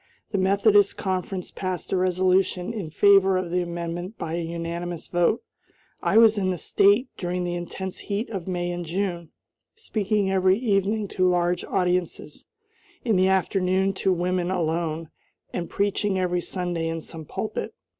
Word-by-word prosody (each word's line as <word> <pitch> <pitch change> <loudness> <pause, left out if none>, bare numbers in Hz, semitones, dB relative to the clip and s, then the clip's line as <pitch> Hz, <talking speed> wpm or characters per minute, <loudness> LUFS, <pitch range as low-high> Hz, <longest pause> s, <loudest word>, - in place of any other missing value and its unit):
The 200 - 0
Methodist 200 +1 +4
conference 185 -1 -3
passed 185 -1 -4
a - - +3
resolution 185 +1 +1
in 200 -8 -4
favor 195 +2 +5
of 180 -2 -3
the 180 0 +1
amendment 175 +3 -5
by 160 - -4
a 170 - -1
unanimous 170 0 -4
vote. 175 +5 +1 0.6
I - - +2
was 225 -2 +6
in 190 -1 0
the 180 - -1
State 205 - +3
during 180 0 -2
the 175 0 -2
intense 180 +2 -5
heat 205 +3 -3
of 190 -5 -5
May 175 -1 -2
and 175 0 -4
June, 175 -1 -3 0.5
speaking 210 - -1
every 190 0 +3
evening 210 -2 +1
to 185 0 +1
large 175 0 +1
audiences; 180 -1 -1 0.6
in 225 -4 +2
the 185 0 +4
afternoon 190 0 +2
to 190 - +3
women 180 0 0
alone, 165 -2 -1 0.4
and 170 -2 -3
preaching 200 -1 0
every 180 -1 0
Sunday 175 -3 -3
in 165 0 -3
some 160 0 -8
pulpit. 215 +7 -4
185 Hz, 155 wpm, -25 LUFS, 175-195 Hz, 0.6 s, was